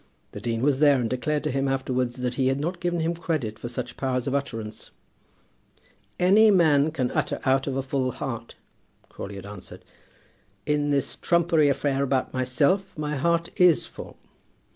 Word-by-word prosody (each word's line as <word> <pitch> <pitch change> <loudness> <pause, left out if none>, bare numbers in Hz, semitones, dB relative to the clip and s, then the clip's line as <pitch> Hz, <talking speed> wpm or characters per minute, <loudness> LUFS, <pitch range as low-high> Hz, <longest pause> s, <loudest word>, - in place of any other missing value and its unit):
The - - -8
dean 115 0 -2
was 140 -1 +2
there 145 -3 +5
and 120 - 0
declared 145 +5 -1
to 150 - -1
him 135 +1 0
afterwards 130 -2 -1
that 125 -1 -2
he 130 +1 0
had 135 +1 +1
not 175 +4 -3
given 175 -1 -1
him 165 +1 0
credit 150 -11 -3
for 120 - -5
such 125 0 -5
powers 130 -2 -1
of 135 - -2
utterance. 115 -6 -4 1.3
"Any 205 +5 +6
man 155 -6 +4
can 130 -6 -2
utter - - -1
out 135 +1 +2
of 135 - -2
a 135 - -1
full 130 -1 -1
heart," 120 -4 -6 0.5
Crawley 100 - -8
had 95 0 -8
answered. 100 -2 -11 0.8
"In 150 0 0
this 140 -2 0
trumpery 170 -3 +3
affair 140 0 0
about 135 -2 0
myself, 135 +10 +1
my 150 0 -2
heart 170 +4 0
is 180 -3 +5
full! - - -11
140 Hz, 175 wpm, -25 LUFS, 125-155 Hz, 1.3 s, Any